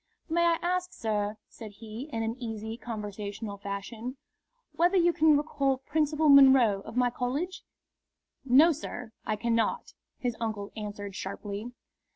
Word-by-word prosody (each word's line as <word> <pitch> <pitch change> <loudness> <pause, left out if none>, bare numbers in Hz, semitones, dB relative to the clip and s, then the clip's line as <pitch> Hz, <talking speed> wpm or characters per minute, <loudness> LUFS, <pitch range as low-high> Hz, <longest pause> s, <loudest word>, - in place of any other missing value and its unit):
"May 340 0 +2
I 335 -1 +3
ask, 365 +1 -1
sir," 210 -1 -2
said 215 -3 -10
he, 225 +6 -8
in 225 -2 -2
an 225 +1 -2
easy 220 -1 -4
conversational 210 -2 -6
fashion, 215 +6 -6 0.6
"whether 355 +3 +3
you 345 -1 +4
can 310 -2 +5
recall 280 -3 0
Principal 305 +3 0
Munro, 265 -8 +7
of 220 +4 -9
my 250 -1 +3
college?" 275 +10 -3 0.8
"No, 275 +6 +6
sir, 250 -6 -6 0.2
I 215 - +1
cannot," 230 +1 0 0.2
his 245 -2 -2
uncle 215 -3 -3
answered, 205 -2 -6
sharply. 200 +4 -5
235 Hz, 140 wpm, -29 LUFS, 215-290 Hz, 0.8 s, Munro